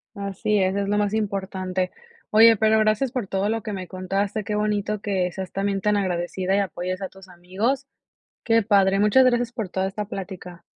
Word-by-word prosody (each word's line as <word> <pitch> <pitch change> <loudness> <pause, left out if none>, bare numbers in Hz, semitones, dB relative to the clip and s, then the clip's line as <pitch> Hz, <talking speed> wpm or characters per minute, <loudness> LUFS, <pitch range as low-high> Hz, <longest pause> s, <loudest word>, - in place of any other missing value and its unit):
Así 200 +1 -1
es, 190 0 +1
es 200 0 -1
lo 205 +1 +1
más 205 0 0
importante. 190 -3 -2 0.4
Oye, 225 +1 +7
pero 220 +1 +3
gracias 215 +4 +2
por 245 -6 -3
todo 195 +2 -1
lo 225 0 -2
que 215 -2 -4
me 185 -2 -5
contaste, 195 +3 -2
qué 210 - -4
bonito 210 0 -1
que 185 -4 -1
seas 190 0 -6
también 195 0 -1
tan 210 +1 +2
agradecida 185 0 -1
y - - +3
apoyes 185 -1 -3
a 190 - -4
tus 190 0 -16
amigos. 200 +10 -2 0.6
Qué 230 -2 +3
padre, 195 -2 +3
muchas 210 +6 +5
gracias 240 -1 +2
por 220 -6 -4
toda 190 +1 -1
esta 210 +2 -4
plática. 185 -4 -8
200 Hz, 195 wpm, -24 LUFS, 190-215 Hz, 0.6 s, Oye